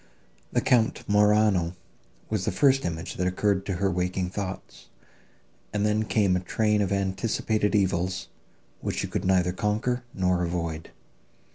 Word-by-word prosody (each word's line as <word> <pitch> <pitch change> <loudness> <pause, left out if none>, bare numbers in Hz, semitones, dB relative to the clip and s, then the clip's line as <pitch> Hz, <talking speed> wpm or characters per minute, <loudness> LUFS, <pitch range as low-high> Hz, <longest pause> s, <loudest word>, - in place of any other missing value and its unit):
The - - +1
Count 115 -3 +2
Morano 105 -4 +3 0.5
was - - -1
the - - 0
first 135 -1 +3
image 85 0 -4
that 90 - 0
occurred 95 +1 0
to 100 - -1
her 95 +2 0
waking 90 +1 -1
thoughts, 95 -10 -6 0.8
and 105 0 0
then 105 +1 +1
came 100 -4 +2
a - - +1
train 105 +3 +1
of 100 -2 0
anticipated 105 +2 0
evils, 95 -2 0 0.5
which - - -3
she - - -1
could 95 - -3
neither 90 -1 +3
conquer, 110 +6 -1
nor 90 -2 +1
avoid. 85 -2 -3
95 Hz, 145 wpm, -26 LUFS, 90-105 Hz, 0.8 s, Morano